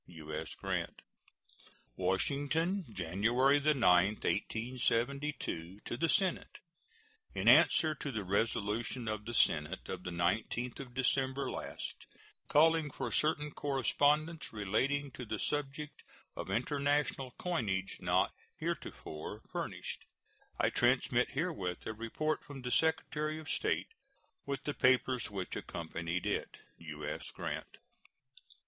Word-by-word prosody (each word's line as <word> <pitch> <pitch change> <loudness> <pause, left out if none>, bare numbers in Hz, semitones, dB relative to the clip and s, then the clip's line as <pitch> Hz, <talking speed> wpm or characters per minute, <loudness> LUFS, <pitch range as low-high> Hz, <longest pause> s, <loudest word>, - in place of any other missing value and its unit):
U.S. 80 -2 -6
GRANT. - - -3 0.9
WASHINGTON, 145 - +1
January 120 - +3
9, 145 - -8
1872. 115 - +1
To - - -3
the 165 +6 +1
Senate: 190 -4 +1 0.8
In - - -1
answer 155 -1 +7
to 140 -1 -5
the 110 -4 -2
resolution 110 +4 0
of 110 -1 -2
the 120 - -4
Senate 80 +2 +2
of 95 - -4
the - - -4
19th 110 +8 0
of 125 -3 -8
December 135 0 +1
last, - - -6 0.4
calling 160 0 +5
for - - -4
certain 150 -1 +1
correspondence 145 +3 +1
relating 130 +8 0
to 125 - -7
the 110 -2 -3
subject 145 +3 -3 0.3
of - - -5
international 140 0 0
coinage 100 - -1
not - - +2 0.3
heretofore 75 0 -5
furnished, - - -4 0.5
I - - +3
transmit 125 0 +3
herewith 135 - -2
a 110 - -3
report 115 +8 -2
from 135 -3 -9
the 125 - -2
Secretary 155 0 +1
of 155 -1 -9
State, 430 - 0 0.6
with 140 -1 -2
the 145 - -1
papers 130 -2 +3
which 95 -3 -4
accompanied 85 +1 -3
it. - - -2 0.2
U.S. 75 -2 -5
GRANT. - - -5
125 Hz, 115 wpm, -34 LUFS, 100-145 Hz, 0.9 s, answer